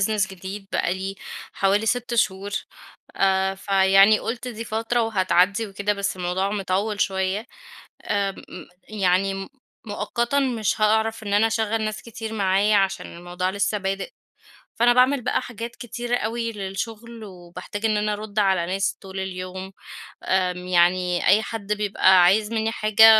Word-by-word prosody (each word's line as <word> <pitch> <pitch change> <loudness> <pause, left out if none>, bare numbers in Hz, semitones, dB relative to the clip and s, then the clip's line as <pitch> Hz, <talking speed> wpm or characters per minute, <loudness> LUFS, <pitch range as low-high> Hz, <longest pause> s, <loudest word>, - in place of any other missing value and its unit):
business 210 0 +1
جديد 190 +2 -8
بقى 180 - +1
لي 190 +1 -4 0.4
حوالي 200 +3 +1
6 245 +1 0
شهور، 200 -4 0 0.7
آآ 190 0 +2
فيعني 195 +2 +5
قُلت 245 +2 -4
دي 230 -1 -6
فترة 230 +2 0
وهتعدي 200 0 +2
وكده. 200 +1 -1
بس 200 -1 -2
الموضوع 185 +2 -1
مطول 200 +1 -1
شويّة. 190 +3 0 0.6
آمم، 200 -1 0 0.2
م 180 - -9 0.2
يعني 195 -2 +1
م 195 0 -6 0.4
مؤقتًا 235 +5 -1
مش 235 -5 0
هأعرف 220 +1 +2
إن 205 -2 -4
أنا 210 +2 +4
أشغل 225 0 0
ناس 215 0 -4
كتير 225 -1 -7
معايا 200 0 +2
عشان 195 -3 -1
الموضوع 175 +1 -3
لسّه 200 +2 0
بادئ، 195 0 -3 0.6
فأنا 240 +1 +4
باعمل 255 +2 +3
بقى 250 +1 0
حاجات 235 0 -7
كتيرة 240 +1 -3
أوي 230 0 -2
للشغل 220 +3 -6
وباحتاج 180 +2 -9
إن 215 -1 +1
أنا 210 0 0
أرد 210 0 -5
على 190 -4 +2
ناس 195 +2 -1
طول 190 -1 -7
اليوم. 185 0 -6 0.5
آمم، 180 -1 0
يعني 180 0 +2
أي 205 +3 +6
حد 210 -2 -3
بيبقى 190 -3 +4
عايز 210 +4 +3
مِنّي 220 0 0
حاجة، 215 0 +5
200 Hz, 150 wpm, -23 LUFS, 190-220 Hz, 0.7 s, أي